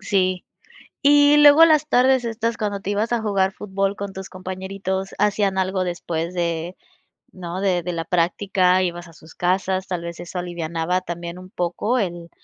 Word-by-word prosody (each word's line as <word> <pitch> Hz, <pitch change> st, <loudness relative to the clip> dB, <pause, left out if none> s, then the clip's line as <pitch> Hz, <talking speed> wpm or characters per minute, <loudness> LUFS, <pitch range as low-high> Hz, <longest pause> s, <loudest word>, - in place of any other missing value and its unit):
Sí. 185 Hz, -3 st, 0 dB, 0.6 s
Y 290 Hz, +1 st, +6 dB
luego 295 Hz, +2 st, +8 dB
las 310 Hz, -2 st, +3 dB
tardes 255 Hz, -1 st, +3 dB
estas 230 Hz, 0 st, -2 dB
cuando 205 Hz, -2 st, -2 dB
te 195 Hz, -, -6 dB
ibas 210 Hz, +3 st, -1 dB
a 235 Hz, -, 0 dB
jugar 195 Hz, -3 st, +1 dB
fútbol 195 Hz, 0 st, -2 dB
con 200 Hz, -1 st, -5 dB
tus 190 Hz, 0 st, -8 dB
compañeritos, 190 Hz, +1 st, -4 dB
¿hacían 205 Hz, -2 st, +1 dB
algo 190 Hz, 0 st, 0 dB
después 170 Hz, -1 st, -3 dB
de?, 170 Hz, 0 st, -2 dB, 0.6 s
¿no? 180 Hz, 0 st, -6 dB
De 180 Hz, -3 st, +1 dB
de 180 Hz, +1 st, -3 dB
la 165 Hz, -1 st, -3 dB
práctica, 180 Hz, +1 st, +2 dB
¿ibas 175 Hz, -1 st, -3 dB
a 165 Hz, -, -15 dB
sus 160 Hz, 0 st, -16 dB
casas? 185 Hz, +1 st, 0 dB
Tal 180 Hz, -2 st, -3 dB
vez 170 Hz, 0 st, -7 dB
eso 175 Hz, +1 st, -6 dB
alivianaba 170 Hz, 0 st, -2 dB
también 175 Hz, -1 st, -6 dB
un 185 Hz, 0 st, -11 dB
poco 205 Hz, +8 st, -1 dB
el 175 Hz, -4 st, -4 dB
185 Hz, 175 wpm, -22 LUFS, 175-205 Hz, 0.6 s, luego